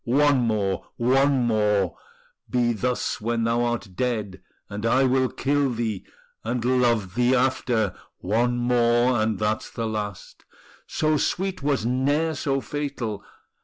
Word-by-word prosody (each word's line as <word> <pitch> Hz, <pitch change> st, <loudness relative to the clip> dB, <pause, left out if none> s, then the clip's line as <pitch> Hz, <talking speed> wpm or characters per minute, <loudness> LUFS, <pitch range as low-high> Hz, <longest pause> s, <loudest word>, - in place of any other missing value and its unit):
one 145 Hz, +2 st, +3 dB
more, 105 Hz, -5 st, 0 dB
one 135 Hz, +1 st, +3 dB
more 105 Hz, -5 st, +1 dB, 0.5 s
Be 120 Hz, -1 st, +1 dB
thus 125 Hz, +2 st, -2 dB
when 115 Hz, +1 st, -1 dB
thou 115 Hz, +1 st, +1 dB
art 120 Hz, -4 st, -2 dB
dead, 105 Hz, -5 st, -2 dB, 0.3 s
and 105 Hz, +1 st, -6 dB
I 125 Hz, +4 st, +3 dB
will 130 Hz, 0 st, +2 dB
kill 145 Hz, 0 st, 0 dB
thee, 110 Hz, -4 st, -3 dB, 0.4 s
And 120 Hz, +1 st, -2 dB
love 120 Hz, -7 st, +2 dB
thee 125 Hz, +2 st, +3 dB
after: 125 Hz, -5 st, +1 dB, 0.2 s
One 120 Hz, +5 st, 0 dB
more, 120 Hz, 0 st, +2 dB
and 110 Hz, -1 st, 0 dB
that's 110 Hz, +1 st, -1 dB
the 115 Hz, -, -4 dB
last: 105 Hz, -4 st, -5 dB, 0.4 s
So 155 Hz, 0 st, +1 dB
sweet 185 Hz, +3 st, -1 dB
was 140 Hz, -5 st, 0 dB
ne'er 145 Hz, +6 st, +1 dB
so 135 Hz, -2 st, -1 dB
fatal. 130 Hz, -9 st, -4 dB
120 Hz, 135 wpm, -24 LUFS, 110-130 Hz, 0.5 s, one